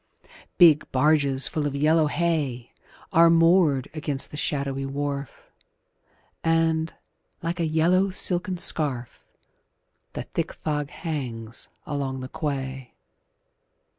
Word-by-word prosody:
Big 165 -5 +5
barges 140 -1 +3
full 150 -2 -2
of 140 - -4
yellow 155 +2 +3
hay 145 -7 -2 0.4
Are 165 +1 +6
moored 165 -5 +4
against 150 -3 -2
the - - -8
shadowy 140 -2 -2
wharf, 140 -1 -5 0.9
And, 165 0 +1 0.5
like 170 +2 -3
a 165 - +1
yellow 175 +5 +2
silken 185 0 +2
scarf, 140 -8 -2 0.9
The - - -4
thick - - -4
fog 150 -2 -3
hangs 125 -10 -5 0.2
along 135 -2 -3
the 130 - -7
quay. 135 -4 -5
150 Hz, 105 wpm, -25 LUFS, 135-165 Hz, 0.9 s, Are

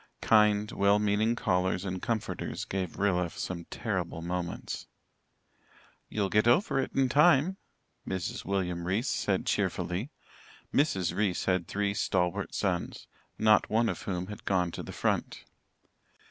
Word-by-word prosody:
Kind, 105 -1 +4
well 100 +1 +3
meaning 105 +2 +2
callers 90 -2 0
and 95 -1 -3
comforters 110 -3 -3
gave 95 -3 -3
Rilla 90 -3 +1
some 85 0 -5
terrible 80 - -3
moments. 90 0 -4 1.2
"You'll 105 -2 0
get 105 +2 +3
over 135 - +3
it 135 - -1
in 135 -1 +3
time," 150 +6 +4 0.5
Mrs. 95 -2 -3
William 90 -3 -2
Reese 105 +8 0
said, - - 0
cheerfully. 95 +10 -1 0.6
Mrs. 95 - +1
Reese 100 -3 0
had 95 -2 +1
three 100 0 -1
stalwart 90 -3 -1
sons, - - -2 0.3
not 110 -1 +4
one 115 +1 +2
of - - -4
whom 90 -2 -3
had 105 +2 -9
gone 90 -3 +1
to - - -6
the - - -8
front. - - -1
100 Hz, 135 wpm, -29 LUFS, 90-110 Hz, 1.2 s, Kind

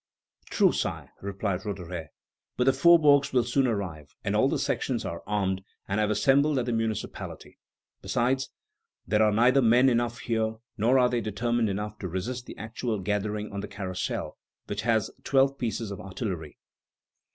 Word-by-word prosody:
"True, - - +4
Sire," - - -3
replied 95 -1 -2
Roederer; 90 -5 -5 0.5
"but 125 - +3
the 135 - +4
faubourgs 145 -1 +5
will 125 -2 +4
soon 130 +3 +2
arrive, 90 -10 -4
and - - 0
all - - +4
the - - 0
sections - - -1
are 85 0 -4
armed, 95 -2 0 0.2
and 100 +2 0
have 105 -1 +2
assembled 140 +6 +3
at 125 - 0
the 120 - -1
municipality; 115 -2 -4 0.4
besides, 130 +2 0 0.6
there 105 0 +2
are 110 -1 +5
neither 125 +5 +4
men 125 +3 +5
enough 120 -1 0
here, 110 -2 -1 0.2
nor 120 +4 +3
are 125 -1 +5
they 120 -1 0
determined 115 +2 0
enough 105 +2 -4
to 95 - -4
resist 120 +8 -4
the - - -9
actual 110 +1 -3
gathering 105 +2 -2
on 100 - -3
the - - -5
Carrousel, 95 -2 -4 0.3
which 105 +1 -3
has 110 -2 +1
twelve 135 0 +2
pieces 115 -2 -2
of 100 - -6
artillery." 90 - -5
110 Hz, 165 wpm, -27 LUFS, 100-125 Hz, 0.6 s, faubourgs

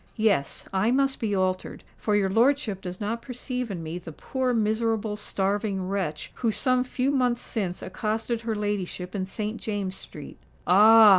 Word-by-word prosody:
Yes—I 200 - +1
must 270 +1 +2
be 210 -3 0
altered; 185 -1 -1
for 210 - 0
your 200 -2 +3
lordship 225 -1 +2
does 180 0 -6
not 225 +2 -2
perceive 250 -1 -4
in 180 -5 -4
me 165 +2 -4
the 170 -2 -9
poor 260 - -1
miserable 220 -1 +1
starving 200 -1 -1
wretch 185 -6 -2
who 235 - +1
some 255 +3 +2
few 255 +1 0
months 250 -3 +1
since 190 -6 -3
accosted 220 +4 -2
her 225 -1 -2
ladyship 200 -3 -2
in 190 -2 -2
Saint 215 +3 -4
James's 200 -3 -2
Street." 150 - -10 0.3
"Ah! 215 +4 +8
210 Hz, 160 wpm, -26 LUFS, 190-230 Hz, 0.3 s, Ah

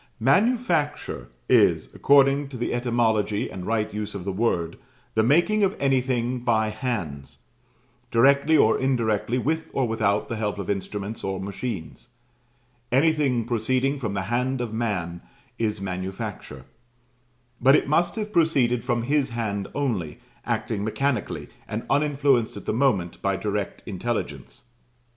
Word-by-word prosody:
"MANUFACTURE" 150 - +1 0.2
is, - - +4
according 140 0 +4
to 130 - -7
the 120 - -2
etymology 115 -4 0
and 90 0 -7
right 110 -1 0
use 105 -1 -4
of 95 -3 -6
the 100 - -1
word, 90 -5 -1 0.3
"the 110 - +3
making 175 - +3
of 195 0 +2
anything 130 -2 +1
by 110 -3 +1
hands," 85 - -4 0.7
directly 140 +6 +4
or 110 -5 +4
indirectly, 120 -3 0
with 160 +6 -1
or 130 -3 +1
without 105 -2 0
the 115 - -4
help 105 -2 -2
of 100 0 -2
instruments 100 +2 -4
or 95 -1 -2
machines. 100 0 -6 0.8
Anything 135 -4 +2
proceeding 130 +4 0
from 110 -6 -3
the 95 - -1
hand 130 +2 0
of 120 -3 -3
man 90 -7 -2 0.4
is 110 -3 -1
manufacture; 95 +3 -5 1.0
but 135 +3 +6
it - - +2
must 170 +4 +2
have 215 -1 -4
proceeded 135 - +2
from 120 -2 0
his 140 +1 +1
hand 110 -4 -3
only, 110 - -2 0.3
acting 105 -3 -1
mechanically, 125 +2 -1 0.2
and 110 +2 -4
uninfluenced 140 -5 +2
at - - -9
the - - -1
moment 105 -9 +1
by 100 0 +1
direct 100 +1 -3
intelligence. 100 - -4
115 Hz, 140 wpm, -25 LUFS, 105-135 Hz, 1.0 s, but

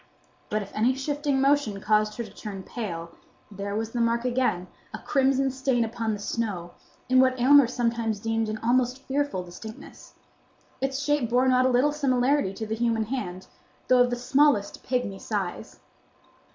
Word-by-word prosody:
But 215 0 -1
if 200 - -13
any 240 +4 +2
shifting 285 0 -1
motion 275 -7 +2
caused 210 +1 +1
her 235 - -2
to - - -11
turn 200 -3 -7
pale 170 -7 -6 0.4
there 200 0 -5
was 225 +1 -3
the 240 - -1
mark 235 +1 +1
again, 245 -8 0 0.3
a - - -5
crimson 270 -1 +1
stain 260 -2 0
upon 225 -1 -2
the 205 - -5
snow, 200 -5 -3 0.4
in 255 0 +4
what 260 0 +3
Aylmer 275 +1 +7
sometimes 230 -3 -1
deemed 225 0 -1
an 215 - -3
almost 250 +2 +1
fearful 275 -8 -1
distinctness. 200 +5 -11 0.7
Its 270 +1 -1
shape 290 -5 +1
bore 250 +2 +3
not 255 0 +4
a - - +2
little 255 +4 +3
similarity 275 -4 +1
to 220 +3 -6
the 220 - -3
human 225 -1 0
hand, 210 -6 -5 0.4
though 255 -1 +6
of 245 - +4
the 245 - -1
smallest 250 -3 +2
pygmy 245 -7 -2
size. 195 -5 -4
240 Hz, 170 wpm, -26 LUFS, 215-265 Hz, 0.7 s, Aylmer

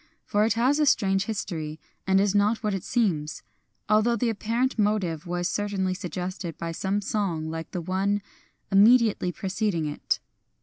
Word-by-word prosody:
For 210 +1 +2
it 225 - +2
has 255 +6 +2
a 300 - +3
strange 195 -5 +3
history, 160 -8 -4 0.3
and 190 0 +4
is 200 0 +2
not 210 +3 +2
what 210 -1 0
it 195 - -3
seems, 170 -11 -1 0.2
— - - -48
although 215 +3 +3
the 235 +1 +1
apparent 230 +4 -1
motive 190 -6 0
was 175 0 -1
certainly 200 -3 -1
suggested 180 -2 -5
by 165 0 -4
some 195 +4 -1
song 175 -7 -2
like 165 0 -5
the 180 - -4
one 195 +4 0 0.5
immediately 215 -2 +5
preceding 190 -2 -1
it. 150 0 -2
195 Hz, 165 wpm, -26 LUFS, 175-215 Hz, 0.5 s, immediately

